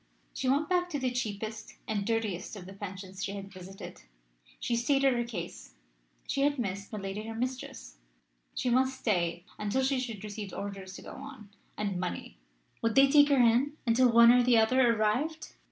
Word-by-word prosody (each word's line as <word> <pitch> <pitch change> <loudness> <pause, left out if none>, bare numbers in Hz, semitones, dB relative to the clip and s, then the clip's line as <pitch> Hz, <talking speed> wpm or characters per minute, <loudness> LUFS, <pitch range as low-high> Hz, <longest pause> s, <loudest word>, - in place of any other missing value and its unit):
She 255 - -1
went 285 +3 +2
back 360 0 +1
to 295 -4 -2
the 255 -1 0
cheapest 220 -2 -4
(and 205 -2 -2
dirtiest) 220 -5 -2
of 190 -3 -9
the 190 - -10
pensions 195 -1 -7
she 200 - -3
had 195 -1 -8
visited. 185 +1 -10 0.6
She 235 - -1
stated 270 +3 +3
her 240 0 0
case 230 - -7 0.5
she 275 - -1
had 285 +1 +2
missed 200 -4 -4
milady 195 -1 -4
her 225 0 -6
mistress 240 - -5 0.6
she 250 - 0
must 260 +1 +2
stay 175 -4 0
until 210 +6 0
she 265 0 +1
should 230 -5 -5
receive 205 -1 -6
orders 195 -2 -6
to - - -10
go - - -9
on, 260 -8 -10 0.3
and 200 -3 -2
money 85 - -5 0.4
would 230 -1 0
they 275 0 +6
take 290 0 +7
her 280 - +4
in 250 +5 +3
until 240 +1 +4
one 235 0 +8
or 250 0 +6
the 245 -1 +4
other 240 +2 +4
arrived? 240 +9 -1
225 Hz, 185 wpm, -30 LUFS, 200-260 Hz, 0.6 s, one